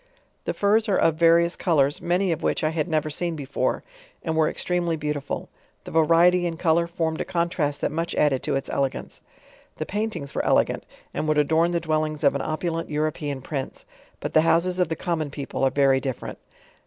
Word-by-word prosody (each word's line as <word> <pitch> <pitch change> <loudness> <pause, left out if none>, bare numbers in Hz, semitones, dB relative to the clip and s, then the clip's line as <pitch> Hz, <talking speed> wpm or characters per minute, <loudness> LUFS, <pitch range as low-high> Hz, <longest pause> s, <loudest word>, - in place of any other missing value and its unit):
The - - -2
furs 215 +2 +2
are 195 - +3
of 165 - +3
various 170 +1 +4
colors, 145 -4 +1
many 180 +2 +1
of 160 - -1
whifeh - - -1
I 155 - +3
had 160 0 -1
never 155 -2 0
seen 170 +2 -2
before, 140 -2 -2 0.4
and 160 -1 -1
were 160 -1 +3
extremely 175 -2 -1
beautiful;^ 150 -2 -3 0.4
the - - -9
variety 170 +3 +4
in 165 -1 -4
color 170 0 +2
formed 165 -2 -2
a - - +1
contrast 170 -5 -1
that - - 0
much 165 +2 -2
added 140 -4 +2
to - - -1
its 135 - -2
elegance. 135 -1 -2 0.3
* - - -28
The 155 - -3
paintings 205 -8 -3
were - - -1
elegant, - - +1 0.3
and 155 - -2
would 155 -1 +2
adorn 160 +3 +3
the 175 -1 0
dwellings 155 -1 -1
of 140 - +5
an 140 - -2
opulent 165 +1 -2
European 150 -3 -2
Prince. 135 -3 -5 0.3
But - - -5
the 155 - +6
houses 175 +3 +2
of 180 - +2
the 160 - -1
com 170 -2 -2
mon 155 -2 -2
people 140 -1 -4
are 135 - +5
very 135 -1 +3
different. 130 -3 -5
160 Hz, 205 wpm, -24 LUFS, 150-170 Hz, 0.4 s, the